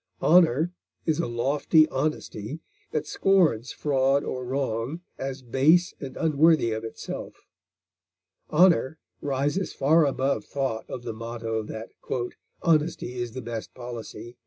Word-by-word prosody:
Honor 165 -1 +5 0.3
is 160 -1 +1
a 170 - 0
lofty 140 +6 +3
honesty 135 -2 -3 0.3
that 155 -1 -2
scorns 155 - +2
fraud 135 -1 +1
or 130 0 -4
wrong 130 +3 -2 0.2
as 135 0 -4
base 150 +9 +3
and 135 -2 -7
unworthy 155 -5 +4
of 110 0 -3
itself. 115 - -7 1.0
Honor 160 -4 +4 0.2
rises 145 +7 -1
far 150 +3 +4
above 135 -4 0
thought 130 -4 -3
of 120 - -6
the 115 -2 -4
motto 115 0 -3
that 110 +1 -7 0.7
"honesty 160 -6 +1
is 120 -2 -3
the 130 -1 -6
best 115 -1 -6
policy." 120 -1 -8
135 Hz, 125 wpm, -26 LUFS, 120-155 Hz, 1.0 s, Honor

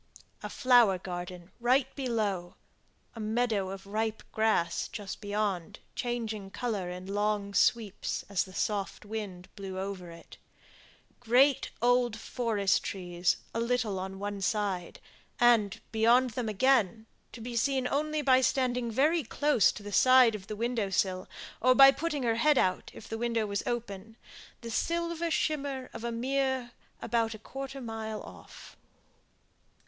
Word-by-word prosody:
A - - -5
flower 245 -7 +4
garden 180 0 -7
right 255 +2 +2
below; 215 -9 -2 0.6
a - - -8
meadow 215 -3 0
of 195 0 -8
ripe 220 +2 -2
grass 215 -6 +1
just 205 -2 -7
beyond, 205 -4 -2 0.2
changing 225 -5 -3
colour 205 -5 -3
in 180 +1 -7
long 205 0 -1
sweeps, 215 -2 +1
as 200 -2 +1
the 185 - -13
soft 205 -1 -2
wind 205 -4 -6
blew 195 -2 -6
over 190 -2 -5
it; 165 0 -13 0.8
great 250 +3 +3
old 245 -2 +3
forest 220 -4 0
trees 175 -2 -1 0.2
a - - -1
little 235 -4 0
on 190 +1 -5
one 205 0 -4
side; 195 -4 -1 0.4
and, 230 -5 +4
beyond 235 +3 +4
them 225 0 -3
again, 220 -2 +2 0.3
to - - -10
be 235 +1 -6
seen 260 +2 +1
only 305 +2 -1
by 260 -1 +5
standing 250 -2 +1
very 300 +8 +2
close 290 -10 +3
to 210 - -10
the 205 - -7
side 255 +1 +6
of 200 -2 -7
the 215 - -5
window 230 -2 -1
sill, 185 -1 -1 0.3
or 255 +1 +5
by 275 0 +9
putting 295 0 -3
her 230 -1 +1
head 295 +4 +4
out, 185 -5 +1
if 220 - -11
the 225 - -5
window 230 -2 0
was 200 -1 -2
open, 225 -2 -4 0.4
the 230 -1 -6
silver 335 +5 -1
shimmer 280 -5 -1
of - - -8
a 235 - -2
mere, 260 +1 -1 0.3
about 230 -1 0
a - - -8
quarter 270 +5 -7
of 270 - -7
a - - -7
mile 220 -1 -5
off. - - -13
225 Hz, 155 wpm, -30 LUFS, 200-250 Hz, 0.8 s, by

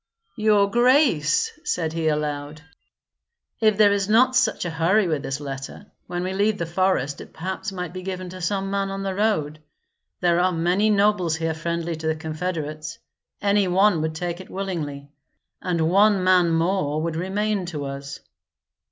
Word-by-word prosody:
"Your 210 -2 +3
grace," 240 - +3
said 160 -2 -1
he, 165 -1 -1
aloud, 150 0 -2 1.0
"if 215 -3 +3
there 210 -1 +6
is 200 0 0
not 250 +4 +4
such 250 -7 +2
a 175 - -2
hurry 175 +5 +2
with 155 -4 -1
this 135 +1 -4
letter, 140 +7 -7 0.2
when 175 0 -3
we 185 +1 -2
leave 205 +2 +1
the 170 - -2
forest 170 -5 0
it - - -12
perhaps 190 +4 -4
might 180 -3 -5
be 185 - -6
given 185 0 -5
to 185 +1 -9
some 195 +3 -1
man 200 0 -1
on 195 0 -4
the 195 -1 -2
road. 185 -8 0 0.6
There 175 -1 +2
are 185 +1 +3
many 180 +5 +1
nobles 200 -5 +2
here 160 0 -1
friendly 170 +1 -3
to 160 0 -4
the 160 - +1
confederates; 155 -1 -4 0.5
any 200 -1 +3
one 185 -1 +3
would 160 0 -2
take 175 +2 -4
it - - -13
willingly, 155 -8 -4 0.5
and 170 -3 0
one 200 0 +4
man 185 -2 +4
more 165 -2 0
would 165 -1 -2
remain 195 +2 -1
to 150 -5 -4
us." 140 0 -7
180 Hz, 170 wpm, -23 LUFS, 160-200 Hz, 1.0 s, there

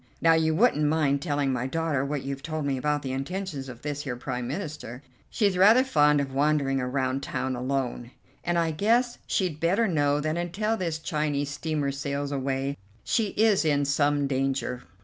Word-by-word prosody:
Now, 165 0 +5
you 160 -1 +2
wouldn't 180 -6 +3
mind 145 -2 +2
telling 145 -4 0
my 125 0 -1
daughter 160 -2 -1
what 140 0 -3
you've 135 0 -4
told 155 -1 -3
me 140 -1 0
about 145 +2 -1
the 130 - -3
intentions 140 0 -4
of 120 -2 -11
this 145 -1 -3
here 130 -4 -4
Prime 125 0 -4
Minister? 145 - -6 0.3
She's 200 -4 +1
rather 220 +7 +7
fond 150 - +4
of 135 -1 -3
wandering 140 -1 +1
around 130 +1 -1
town 130 -1 -2
alone, 125 -1 -2 0.3
and 175 0 0
I 165 -1 +1
guess 235 +9 +1
she'd 175 -6 -1
better 190 +8 +2
know 145 -5 +2
that 155 +2 -1
until 195 +6 -1
this 170 -6 -2
Chinese 150 -2 -1
steamer 150 -1 -2
sails 140 +1 -3
away 135 0 -2 0.3
she 225 -2 +1
is 215 -3 +4
in 145 -2 +2
some 145 0 +2
danger." 135 -2 -1
145 Hz, 180 wpm, -27 LUFS, 135-165 Hz, 0.3 s, rather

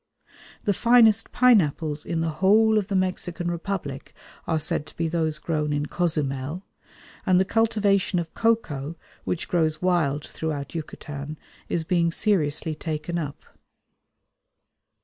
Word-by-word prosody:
The 205 - +2
finest 225 0 +4
pineapples 160 - +3
in 165 -1 -1
the 165 - 0
whole 215 +3 +5
of 200 - -4
the 200 - -2
Mexican 180 -2 -1
Republic 170 -6 -5 0.3
are 160 - +1
said 150 -1 -1
to - - -16
be 165 - 0
those 160 -2 0
grown 150 -1 -2
in 145 0 0
Cozumel, 150 0 -2 0.6
and 185 -3 +4
the 190 - +3
cultivation 205 -4 +2
of 170 -2 -3
cocoa, 170 - 0 0.3
which 175 - -2
grows 160 -3 +1
wild 160 -6 +1
throughout 150 -3 -4
Yucatan, 150 -2 -6 0.3
is 165 - 0
being 170 -1 +1
seriously 160 -6 +1
taken 155 +2 -3
up. 145 -3 -6
170 Hz, 130 wpm, -25 LUFS, 150-195 Hz, 0.6 s, whole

